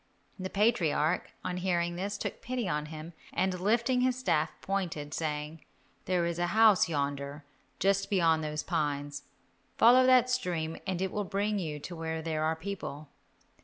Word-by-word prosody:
The 185 0 -3
patriarch, 180 -7 +2 0.2
on 180 - -2
hearing 175 -2 0
this, 200 +3 -3
took - - -5
pity 245 -3 -2
on 150 -2 -1
him, 155 +2 -8 0.2
and 185 -1 0
lifting 235 +6 +2
his 255 0 +2
staff, 160 -11 +1
pointed, 170 -7 -3
saying, 150 0 -3 0.4
"There 180 -2 +1
is 170 0 -2
a 175 - +1
house 215 -5 +6
yonder, 140 -1 -3 0.3
just 195 0 +1
beyond 165 -5 +3
those 150 0 -3
pines, 145 -4 -2 0.6
follow 250 +3 +7
that 255 -1 +6
stream 175 -10 -1
and 185 -1 -1
it 190 - -2
will 210 - -1
bring 205 +2 -1
you 155 -5 -4
to 175 - -7
where 160 0 -4
there 155 -1 -1
are 160 +1 +1
people." 160 -5 -6
175 Hz, 165 wpm, -30 LUFS, 155-200 Hz, 0.6 s, follow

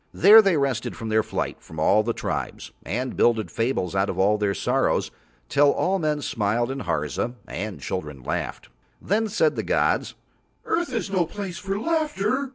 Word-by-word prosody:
There 210 +5 +9
they 195 -6 +2
rested 125 -4 -1
from 115 - -6
their 110 0 +3
flight - - -4
from 80 0 -10
all 100 +7 +4
the 115 +2 -1
tribes, - - -4
and 125 +5 -3
builded 115 -3 +2
fables 115 -7 -1
out 95 +1 +1
of 90 - -3
all 105 +3 +3
their 100 -1 0
sorrows - - 0 0.4
till 145 - +4
all 190 +2 0
men 150 -3 -1
smiled 115 +3 0
in 135 - -4
Harza 75 - -2
and 105 0 -5
children 75 -8 -5
laughed. - - -4 0.3
Then 220 +4 0
said 215 +2 +1
the - - -1
gods, - - 0 0.5
"Earth 340 -4 -1
is 230 -5 -3
no 180 -4 +1
place 190 -1 -6
for 195 0 -3
laughter." 280 -4 0
130 Hz, 175 wpm, -24 LUFS, -, 0.5 s, There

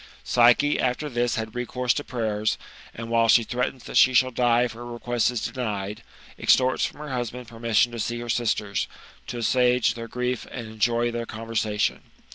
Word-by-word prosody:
Psyche 125 +4 +4
after 130 +4 0
this 120 -2 0
had 110 -1 -4
recourse 125 0 -1
to 145 - -3
prayers, 110 -4 -1 0.3
and, 115 0 -8
while 115 0 +3
she 115 +1 +6
threatens 125 +2 -3
that - - -3
she 130 0 +6
shall 130 +1 +4
die 120 -1 +3
if 125 - -1
her 115 +1 -9
request 120 0 -1
is 125 -3 -3
denied, 105 -5 -4 0.4
extorts 130 0 +3
from - - -3
her 150 -2 -6
husband 125 -1 -4
permission 115 0 +1
to 120 - -6
see 120 +2 -2
her 120 - -6
sisters, 110 -4 0 0.4
to 120 - -5
assuage 125 0 +2
their 115 0 -7
grief 125 +1 -3
and 120 -3 -6
enjoy 115 +2 0
their 115 0 -4
conversation. 110 -1 -1
120 Hz, 180 wpm, -25 LUFS, 115-125 Hz, 0.4 s, she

